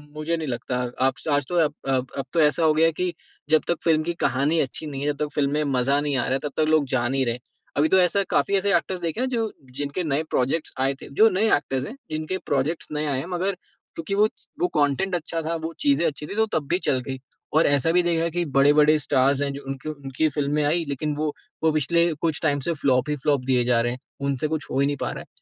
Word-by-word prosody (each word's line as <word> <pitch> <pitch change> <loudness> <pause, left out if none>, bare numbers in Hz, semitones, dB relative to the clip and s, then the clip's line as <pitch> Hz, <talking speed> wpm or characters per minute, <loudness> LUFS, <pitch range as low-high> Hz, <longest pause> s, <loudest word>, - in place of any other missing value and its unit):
मुझे 155 +2 -1
नहीं 160 - -4
लगता 125 0 -3 0.3
आप 135 - +3 0.2
आज 145 -1 +2
तो 175 - -2
अब 150 - -3
अब 130 -1 +1
अब 135 - -2
तो 170 - +2
ऐसा 150 +2 +3
हो 155 -1 +5
गया 160 +1 +4
है 165 - +4
कि 180 +2 -2 0.4
जब 155 0 +5
तक 170 - +2
फ़िल्म 160 -2 +3
की 170 +2 -2
कहानी 140 +6 +2
अच्छी 140 +2 -2
नहीं 140 -2 -5
हैं, 145 +1 +1
जब 145 - -8
तक 150 - -10
फ़िल्म 140 -1 +1
में 150 +1 +1
मज़ा 140 0 +1
नहीं 145 -1 -1
आ - - +2
रहा 125 - -2
हैं, 135 - +1
तब 150 - -3
तक 155 - +3
लोग 155 -2 +4
जा 120 -1 +1
नहीं 135 +1 0
रहे 120 - 0
हैं। 125 - -9 0.4
अभी 150 +2 +4
तो 190 - +5
ऐसा 185 +3 +3
काफ़ी 200 - +2
ऐसे 200 +1 +1
एक्टर्स 180 +2 -1
देखे 170 +7 -3
हैं 260 - +1
जो 225 -4 -1 0.2
जिनके 145 +5 -3
नए 155 -1 0
प्रोजेक्ट्स 135 +6 0
आए 135 +1 +2
थे, - - -10
जो 215 +11 +5
नए 210 +3 +1
एक्टर्स 135 -2 -2
हैं, 240 - -8 0.2
जिनके 155 +4 -2
प्रोजेक्ट्स 145 +4 -1
नए 150 0 -2
आये 140 -3 0
हैं 155 - -5
मगर 190 +2 -1 0.4
क्योकि 165 +4 -3
वो 210 +1 +5 0.3
वो 180 - +3
कॉटेंट 150 +5 +1
अच्छा 165 -1 -3
था, 165 +1 -2
वो 160 0 -4
चीज़ें 145 +4 +3
अच्छी 150 0 -4
थी 200 - -6
तो 220 +1 +3
तब 145 -3 -4
भी 180 - +2
चल 130 - +2
गयी। 130 -1 -4 0.3
और 155 +2 +4
ऐसा 145 +2 +2
भी 180 +1 +4
देखा 170 -1 +1
कि 175 +1 -1
बड़े-बड़े 150 +2 +5
स्टार्स 135 0 +2
हैं 140 -1 0
जो 140 - -7
उनके 135 +2 -5
उनकी 140 0 -1
फ़िल्में 150 +1 0
आईं 165 +3 +1
लेकिन 145 +2 -2
वो 150 0 -1 0.3
वो 160 - +4
पिछले 170 +3 +2
कुछ 160 -2 0
टाइम 145 -2 +2
से 170 - +2
फ्लॉप 130 0 +2
ही 150 - +1
फ्लॉप 145 -3 +2
दिए 125 -2 +2
जा 120 -1 +3
रहे 120 - 0
हैं। 130 - -9 0.3
उनसे 140 +2 0
कुछ 155 -1 -3
हो 130 - 0
ही 140 - +4
नहीं 145 - -1
पा - - -1
रहा - - -6
हैं। - - -11
150 Hz, 265 wpm, -24 LUFS, 140-165 Hz, 0.4 s, हो